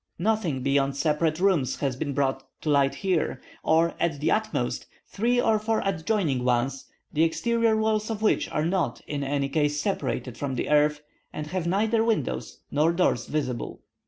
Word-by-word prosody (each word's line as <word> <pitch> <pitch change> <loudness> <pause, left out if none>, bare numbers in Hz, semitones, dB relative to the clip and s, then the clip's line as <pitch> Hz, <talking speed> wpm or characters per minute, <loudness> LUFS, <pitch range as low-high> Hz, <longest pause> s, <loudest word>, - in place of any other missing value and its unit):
Nothing 175 -9 0
beyond 140 0 +1
separate 155 +2 +1
rooms 175 -10 +2
has 135 -3 -2
been 140 +2 -3
brought 135 -1 0 0.2
to 155 - 0
light 140 -1 +3
here, 180 +1 0 0.2
or 165 +1 +3
at 160 -4 0
the 155 +3 +1
utmost, 220 0 -1 0.2
three 240 +4 0
or 220 -3 +3
four 220 +1 0
adjoining 175 - 0
ones, 125 +2 0 0.3
the 150 - +1
exterior 230 +6 +2
walls 220 0 +1
of 220 -1 -3
which 215 - +2
are 150 - -1
not, 170 -9 0
in 145 -1 -3
any 140 0 0
case, 145 0 0
separated 135 - -2
from 135 -2 -2
the - - -2
earth, 150 0 +3 0.3
and 150 - -5
have 170 +2 -3
neither 220 +5 +2
windows 225 -2 -2
nor 150 +3 +3
doors 170 -9 +1
visible. 130 -6 -3
155 Hz, 170 wpm, -26 LUFS, 140-205 Hz, 0.3 s, light